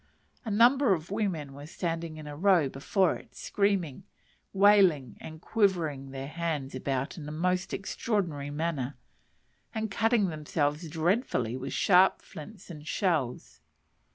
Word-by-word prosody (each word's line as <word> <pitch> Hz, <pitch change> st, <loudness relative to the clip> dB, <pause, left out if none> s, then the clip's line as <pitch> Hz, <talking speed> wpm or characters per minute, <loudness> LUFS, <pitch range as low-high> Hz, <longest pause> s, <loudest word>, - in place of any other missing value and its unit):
A 225 Hz, -, -5 dB
number 240 Hz, +3 st, +5 dB
of 165 Hz, +2 st, -9 dB
women 180 Hz, -10 st, -2 dB
were 145 Hz, +2 st, -10 dB
standing 165 Hz, -1 st, -4 dB
in 155 Hz, -, -9 dB
a 145 Hz, 0 st, -7 dB
row 175 Hz, -2 st, +4 dB
before 170 Hz, +7 st, +1 dB
it, -, -, -18 dB
screaming, 195 Hz, -6 st, -1 dB, 0.5 s
wailing 190 Hz, -, +4 dB
and 160 Hz, 0 st, -9 dB
quivering 165 Hz, -, 0 dB
their 135 Hz, 0 st, -6 dB
hands 155 Hz, -4 st, -3 dB
about 135 Hz, +4 st, -3 dB
in 150 Hz, -1 st, -7 dB
a -, -, -6 dB
most 180 Hz, +4 st, -1 dB
extraordinary 185 Hz, -8 st, -2 dB
manner, 145 Hz, -3 st, -3 dB, 0.8 s
and 220 Hz, -1 st, -2 dB
cutting 220 Hz, -2 st, +2 dB
themselves 150 Hz, 0 st, -2 dB
dreadfully 160 Hz, -, 0 dB
with 130 Hz, +1 st, -5 dB
sharp 185 Hz, 0 st, +4 dB
flints 190 Hz, +3 st, -11 dB
and 150 Hz, -2 st, -10 dB
shells. 155 Hz, -, -1 dB
165 Hz, 135 wpm, -29 LUFS, 145-195 Hz, 0.8 s, number